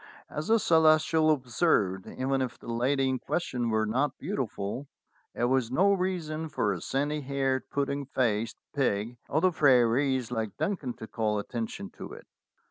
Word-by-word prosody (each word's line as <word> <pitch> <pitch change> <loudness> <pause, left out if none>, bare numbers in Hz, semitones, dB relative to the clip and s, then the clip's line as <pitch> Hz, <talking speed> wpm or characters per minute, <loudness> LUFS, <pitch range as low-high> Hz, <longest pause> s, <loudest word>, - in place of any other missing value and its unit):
As 150 +2 -4
the 225 - +5
Celestial 160 -3 +4
observed, 120 - +1
even 135 +1 -1
if 130 -2 -3
the 115 - -7
lady 135 +3 +1
in 130 -1 0
question 125 -8 -2
were 110 -1 +1
not 130 +6 0
beautiful, 130 - -4 0.5
it - - -2
was 125 -1 +2
no 195 +9 +4
reason 165 -4 -2
for 105 -9 0
a 90 - -6
sandy 145 +2 -1
haired 135 -1 -1
pudding 140 -1 -2
faced 115 -4 0 0.2
pig 120 -3 0
of 155 +3 +1
the 185 - +5
prairies 130 -3 +3
like 110 -3 -3
Duncan 150 -11 -2
to 110 - -8
call 110 -1 -1
attention 110 -1 -4
to - - -7
it. - - -11
130 Hz, 160 wpm, -28 LUFS, 115-155 Hz, 0.5 s, the